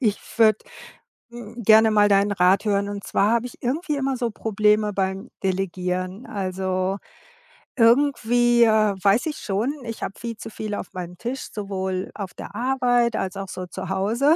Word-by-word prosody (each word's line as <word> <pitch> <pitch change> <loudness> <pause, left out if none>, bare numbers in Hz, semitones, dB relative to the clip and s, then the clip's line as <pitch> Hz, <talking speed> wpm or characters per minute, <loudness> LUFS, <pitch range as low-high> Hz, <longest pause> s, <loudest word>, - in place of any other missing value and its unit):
ich 215 -5 0 0.2
würde, 215 -2 +5 0.7
hm, 235 0 -9
gerne 220 +1 +6
mal 210 -1 +4
deinen 200 0 +3
Rat 185 +2 +3
hören. 200 -1 +1
Und 200 -1 -6
zwar 205 +2 +1
habe 235 +1 +1
ich 245 - -13
irgendwie 295 +5 -1
immer 270 -1 -1
so 240 -2 -1
Probleme 210 0 +1
beim 195 +3 -2
Delegieren, 185 +2 -2
also, 190 -1 -2 0.8
irgendwie, 240 -1 +4
äh, 215 -2 +3
weiß 200 +4 +3
ich 305 - -3
schon, 215 +7 -1
ich 230 -1 -6
habe - - -3
viel 230 -1 -5
zu - - -8
viel 215 -1 -4
auf 195 - -7
meinem 180 -1 -7
Tisch, 245 +6 -5
sowohl 190 -2 -3
auf 195 -4 -6
der - - -9
Arbeit 245 -1 +1
als 190 0 -3
auch 195 -1 -5
so 185 0 -6
zu 185 +1 -7
Hause. 225 +11 +2
210 Hz, 170 wpm, -23 LUFS, 190-235 Hz, 0.8 s, gerne